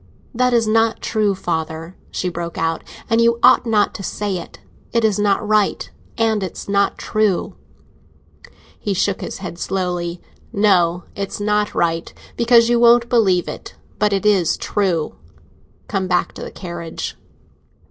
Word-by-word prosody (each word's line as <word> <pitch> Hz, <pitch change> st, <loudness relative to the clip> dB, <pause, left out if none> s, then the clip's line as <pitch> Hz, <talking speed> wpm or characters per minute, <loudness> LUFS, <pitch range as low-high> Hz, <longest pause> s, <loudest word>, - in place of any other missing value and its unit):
"That 250 Hz, +1 st, +2 dB
is 235 Hz, -2 st, +3 dB
not 225 Hz, +1 st, +2 dB
true, 210 Hz, -3 st, 0 dB
father," 165 Hz, 0 st, -4 dB
she 185 Hz, -, -3 dB
broke 170 Hz, -1 st, -5 dB
out, 165 Hz, 0 st, -1 dB, 0.2 s
"and 225 Hz, +1 st, +3 dB
you 235 Hz, 0 st, +4 dB
ought -, -, +6 dB
not 215 Hz, -2 st, +2 dB
to -, -, -7 dB
say 200 Hz, 0 st, -2 dB
it! 170 Hz, -, -11 dB, 0.3 s
It 230 Hz, -1 st, +2 dB
is 210 Hz, -2 st, +1 dB
not 205 Hz, 0 st, +1 dB
right, 215 Hz, -1 st, +1 dB, 0.3 s
and 220 Hz, -2 st, +1 dB
it's 185 Hz, -3 st, -6 dB
not 200 Hz, 0 st, +1 dB
true!" 215 Hz, -4 st, 0 dB, 1.2 s
He 200 Hz, -2 st, -2 dB
shook 195 Hz, +1 st, 0 dB
his -, -, -5 dB
head 170 Hz, -1 st, -7 dB
slowly. 180 Hz, -2 st, -2 dB, 0.3 s
"No, 180 Hz, -4 st, +3 dB
it's 200 Hz, 0 st, -4 dB
not 210 Hz, 0 st, 0 dB
right, 165 Hz, -1 st, 0 dB, 0.2 s
because 235 Hz, 0 st, +5 dB
you 240 Hz, 0 st, +3 dB
won't 235 Hz, 0 st, +5 dB
believe 190 Hz, -7 st, +3 dB
it. -, -, -8 dB, 0.2 s
But 210 Hz, 0 st, +2 dB
it 200 Hz, +1 st, 0 dB
is 195 Hz, -5 st, +3 dB
true. 180 Hz, -7 st, -1 dB, 0.7 s
Come 190 Hz, -1 st, -1 dB
back 180 Hz, -1 st, 0 dB
to -, -, -10 dB
the -, -, -5 dB
carriage." 170 Hz, -2 st, -6 dB
200 Hz, 155 wpm, -20 LUFS, 175-220 Hz, 1.2 s, ought